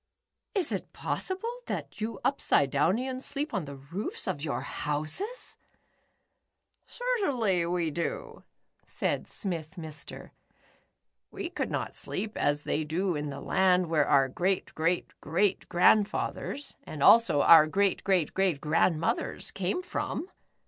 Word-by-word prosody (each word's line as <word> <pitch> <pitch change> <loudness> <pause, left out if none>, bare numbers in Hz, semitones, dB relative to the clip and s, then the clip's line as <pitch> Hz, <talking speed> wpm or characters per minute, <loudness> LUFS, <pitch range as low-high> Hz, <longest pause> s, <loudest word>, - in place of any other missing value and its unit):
"Is 380 -4 +1
it - - -4
possible 385 +6 -3
that - - -5
you 220 -1 -3
Upside 140 -2 +2
downlans 245 - +1
sleep 285 0 -2
on 195 -7 -1
the 140 -1 -8
roofs 150 +10 -5
of 145 - -2
your 150 - -2
houses? 155 - -2 0.6
" - - -51
"Certainly 285 - 0
w^e 170 -2 -1
do," 170 +1 -4 0.4
said - - -2
Smith 170 -4 -2
Mr. 155 -4 -8 1.0
"We - - -6
would - - -1
not - - -3
sleep 215 +2 -1
as 145 0 +1
they 155 - 0
do 175 +4 -1
in 150 0 -3
the 140 0 -7
land 180 -2 +2
where 150 -3 +3
our 135 -1 +4
great 185 +8 -1
great 165 +3 0
great 180 +6 0
grandfathers 210 +9 +1
and 145 -2 -5
also 230 -11 +6
our 160 -2 +8
great 195 +4 +1
great 185 -6 +1
great 190 -6 +1
grandmothers 160 +2 0
came 195 - -2
from." 360 0 -4
180 Hz, 135 wpm, -29 LUFS, 155-220 Hz, 1.0 s, our